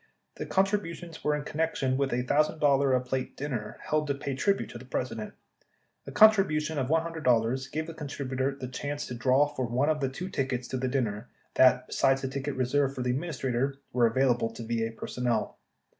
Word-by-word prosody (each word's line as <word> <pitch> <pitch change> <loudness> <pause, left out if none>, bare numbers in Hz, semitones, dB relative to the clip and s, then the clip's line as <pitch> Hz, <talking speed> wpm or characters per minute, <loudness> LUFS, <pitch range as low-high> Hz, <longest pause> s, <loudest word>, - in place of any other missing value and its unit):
The - - -5
contributions 190 -4 -1
were 150 0 +2
in 150 - -3
connection 150 -4 -1
with 135 0 0
a 125 +1 0
$l,000 140 -3 +3
a - - +1
plate 130 +1 -4
dinner 130 -7 -4
held 155 0 +1
to 140 - 0
pay 140 0 -4
tribute 195 +9 0
to 120 - -8
the 130 - -12
President. 125 -3 -4 0.7
A - - -5
contribution 190 -8 +4
of 130 - -1
$100 135 -6 +1
gave 155 +1 -2
the 165 - -7
contributor 135 -3 -3
the 130 - -4
chance 145 +3 -4
to - - -6
draw 130 +4 +3
for 145 -4 -3
one 125 +5 +1
of 155 -1 +1
the 135 -2 0
two 180 +8 -6
tickets 130 -5 -2
to 130 - -2
the 130 +1 -1
din 130 0 +1
ner 105 +1 -5 0.2
that, 130 -1 +5
besides 135 +1 +2
the - - 0
ticket 140 +1 -3
reserved 135 +2 +1
for 125 - -3
the 125 - +1
Administrator, 135 -2 -1 0.2
were 120 -2 +4
avail 130 +2 +3
able 115 -1 -2
to 115 0 -8
VA 115 0 -1
personnel. 120 0 -2
135 Hz, 200 wpm, -28 LUFS, 125-150 Hz, 0.7 s, that